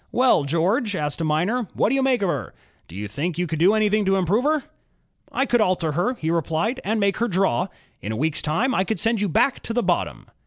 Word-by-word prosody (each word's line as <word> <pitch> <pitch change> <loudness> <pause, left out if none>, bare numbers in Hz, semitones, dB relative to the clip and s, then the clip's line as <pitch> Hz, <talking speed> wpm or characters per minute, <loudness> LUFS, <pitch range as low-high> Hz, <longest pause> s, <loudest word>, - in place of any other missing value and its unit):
''Well, 245 - +3
George," 195 - +1
asked 150 -1 -2
a - - 0
miner, 180 +10 0
*'what - - +2
do - - 0
you 270 - +2
make 260 -5 +2
o' - - +2
her? 140 - -3 0.3
Do 85 - -13
you 105 +2 -5
think 150 - -3
you 180 - 0
could 160 -2 -4
do 190 +6 +5
anything 215 0 +2
to 195 0 +2
improve 195 - +1
her? 305 -2 +1 0.4
" - - -37
''I 270 - 0
could 240 -2 +2
alter 180 -5 +1
her," 180 - 0
he 160 -7 -2
replied, 170 - -1
*'and 220 +2 0
make 200 -1 +1
her 235 - 0
draw. 190 - +1 0.3
In 105 - -4
a 110 - -3
week's 155 +4 -1
time 220 - 0
I 190 - +2
could 220 +3 -2
send 225 -2 +1
you 205 - 0
back 260 - +2
to 230 - -6
the 245 0 0
bottom." - - -1
195 Hz, 250 wpm, -23 LUFS, 160-230 Hz, 0.4 s, do